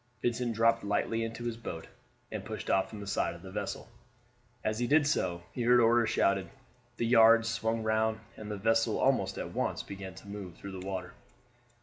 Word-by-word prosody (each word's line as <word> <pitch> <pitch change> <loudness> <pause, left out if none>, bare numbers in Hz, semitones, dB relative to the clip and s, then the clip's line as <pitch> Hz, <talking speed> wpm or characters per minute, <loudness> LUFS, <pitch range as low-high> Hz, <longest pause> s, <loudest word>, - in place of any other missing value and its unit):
Vincent 120 -1 0
dropped 115 +1 +3
lightly 105 +3 0
into 115 +1 -5
his 120 -1 -3
boat; 85 -8 -6 0.5
and - - -4
pushed - - -4
off 95 - +2
from 110 - -8
the 100 - -7
side 100 -3 -1
of 85 - -13
the 95 - -9
vessel. 100 +2 -4 0.8
As 110 +1 -1
he 120 - 0
did 150 +2 +4
so 90 - 0
he 125 - -5
heard 120 +1 +5
orders 115 -1 +4
shouted, 100 -4 +2 0.5
the 115 - 0
yards 115 -1 +6
swung 115 0 -1
round, 110 0 +1 0.2
and 105 -1 -8
the 105 - -3
vessel 115 +3 +2
almost - - +2
at - - -5
once - - -1
began 95 -1 -8
to - - -13
move 100 -4 -7
through 100 - -8
the 95 0 -7
water. 95 -2 -4
110 Hz, 200 wpm, -31 LUFS, 100-115 Hz, 0.8 s, yards